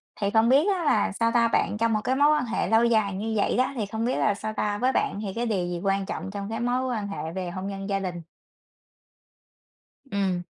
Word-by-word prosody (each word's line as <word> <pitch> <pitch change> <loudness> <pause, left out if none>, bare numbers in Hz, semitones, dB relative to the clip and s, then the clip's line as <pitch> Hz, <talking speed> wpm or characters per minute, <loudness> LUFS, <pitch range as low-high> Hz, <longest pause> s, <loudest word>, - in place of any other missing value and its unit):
Thì 200 -1 -1
không 225 +1 +4
biết 280 +6 +5
á 355 - -3
là 210 -7 +2
sao 230 +3 0
ta? 235 -1 +4
Bạn 220 - 0
trong 230 -1 +2
một 215 - +2
cái 260 - +1
mối 290 +2 +5
quan 300 -4 +1
hệ 230 - -1
lâu 225 +1 +4
dài 215 -4 +2
như 220 +3 -3
vậy 200 - +1
đó, 255 +2 +2
thì 220 -5 -2
không 220 +3 -3
biết 250 - 0
là 210 - +2
sao 215 +1 -5
ta? 205 -1 -1
Với 255 +4 +2
bạn 205 - 0
thì 195 -3 -4
cái 240 +1 -1
điều 190 -6 -1
gì 175 -1 -3
quan 195 0 +1
trọng 190 - -5
trong 200 0 -5
cái 225 0 -3
mối 250 +2 0
quan 205 -2 -3
hệ 160 -5 -5
về 185 -2 -3
hôn 185 +2 -5
nhân 195 0 -5
gia 195 -1 0
đình? 180 -3 -4 1.9
Ừm. 190 -3 0
215 Hz, 250 wpm, -26 LUFS, 195-235 Hz, 1.9 s, biết